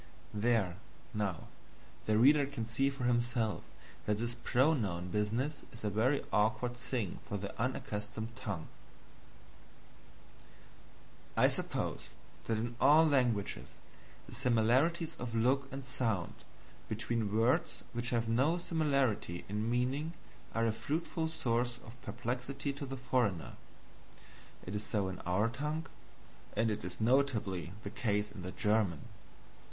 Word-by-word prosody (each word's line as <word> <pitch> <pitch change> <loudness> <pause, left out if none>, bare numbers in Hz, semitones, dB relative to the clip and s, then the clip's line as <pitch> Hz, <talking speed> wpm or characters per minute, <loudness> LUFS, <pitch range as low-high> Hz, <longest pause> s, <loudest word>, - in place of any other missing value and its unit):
There, 105 -4 +2 0.4
now, 100 -6 -2 0.6
the 110 0 +4
reader 140 +4 +6
can 135 -5 -4
see 120 +5 +2
for 135 -2 -5
himself 120 -2 +1 0.5
that 105 -1 +2
this 120 +2 -1
pronoun 120 - +1
business 115 - 0
is 115 - -9
a 105 - 0
very 125 +8 +2
awkward 110 +4 +2
thing 120 -5 -2
for 100 - -1
the 100 0 -5
unaccustomed 110 -2 -3
tongue. 100 -9 -4 2.7
I - - +7
suppose - - -2 0.4
that 115 - +1
in 120 +2 -2
all 155 +3 +8
languages 125 -9 +1 0.5
the - - -10
similarities 130 +7 +2
of 120 -2 -4
look 135 +4 +2
and 135 0 -6
sound 115 -8 -1 0.6
between 110 -1 -1
words 115 +3 +2
which 120 +1 -1
have 115 -1 +1
no 135 +9 +3
similarity 140 - +1
in 105 +3 -1
meaning 130 +7 0 0.4
are 115 0 +3
a 115 - +2
fruitful 160 +7 -1
source 120 -5 0
of 115 - -10
perplexity 130 +3 -3
to 140 0 -5
the 135 0 -5
foreigner. 125 -9 0 1.1
It 95 - -5
is 105 0 -1
so 100 -3 0
in 95 - -6
our 95 +5 +3
tongue, 150 +7 -2 0.7
and 110 0 +3
it 105 - -3
is 90 0 -6
notably 110 - +2
the 100 - -5
case 105 -3 0
in 100 -2 -8
the 90 +1 -5
German. 105 -7 +1
115 Hz, 130 wpm, -34 LUFS, 105-135 Hz, 2.7 s, all